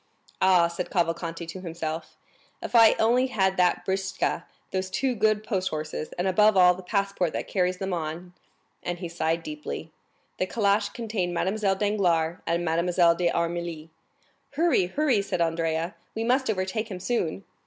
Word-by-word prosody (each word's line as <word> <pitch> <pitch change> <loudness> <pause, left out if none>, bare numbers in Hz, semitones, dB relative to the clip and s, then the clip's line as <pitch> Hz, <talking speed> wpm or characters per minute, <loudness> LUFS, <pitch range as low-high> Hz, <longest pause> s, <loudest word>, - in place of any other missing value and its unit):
"Ah," 180 -3 +5
said 170 +1 -5
Cavalcanti 170 -1 -1
to 165 +3 -8
himself, 165 -2 -5 0.4
"if - - -7
I 225 -2 +8
only 245 +4 +3
had 190 -6 +1
that 180 -1 +2
britzka, 190 0 -1 0.3
those 185 0 -2
two 255 +7 0
good 215 -1 +2
post 190 -4 -1
horses, 155 0 -4
and 175 +2 0
above 210 +2 +4
all 180 -1 +7
the 185 - -9
passport 195 -2 -1
that - - -3
carries 180 -1 0
them 190 0 -3
on!" 170 +2 -4 0.5
And 175 0 -3
he 175 0 -5
sighed 165 0 -1
deeply. 305 0 -6 0.5
The 185 - +1
calash 205 0 +1
contained 210 -7 -3
Mademoiselle 195 +2 +1
Danglars 180 -5 +1
and 170 +1 0
Mademoiselle 170 +1 +3
d'Armilly. 170 -2 -2 0.6
"Hurry, 290 - +2
hurry!" 260 +1 +1
said 195 - -3
Andrea, 165 +1 0 0.2
"we 225 - -1
must 255 +2 +1
overtake 205 +2 -1
him 185 -3 -6
soon." 190 -3 -2
185 Hz, 155 wpm, -26 LUFS, 170-210 Hz, 0.6 s, I